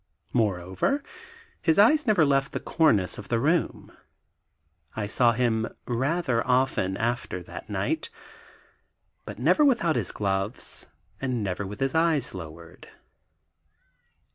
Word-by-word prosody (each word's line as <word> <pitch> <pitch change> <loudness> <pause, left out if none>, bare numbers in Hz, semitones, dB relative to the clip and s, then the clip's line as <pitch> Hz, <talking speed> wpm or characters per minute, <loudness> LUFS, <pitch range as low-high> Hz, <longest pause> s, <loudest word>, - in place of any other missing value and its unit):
Moreover, 100 - 0 0.6
his 160 -2 +2
eyes 275 +8 +5
never 200 -8 +4
left 135 -1 +1
the - - -2
cornice 110 - +2
of 105 - -9
the 115 - 0
room. 160 +6 0 1.0
I 110 - -2
saw 120 +3 +3
him 115 -2 +1 0.2
rather 130 0 0
often 125 -7 +1
after 115 -6 -2
that - - -10
night, - - -2 1.2
but - - -8
never 165 - +3
without 225 - +3
his - - -1
gloves 95 +2 -3 0.3
and 125 -5 -1
never 95 0 -3
with 105 +4 -9
his 135 -1 0
eyes 160 -5 +2
lowered. 85 -2 -10
120 Hz, 120 wpm, -26 LUFS, 100-160 Hz, 1.2 s, eyes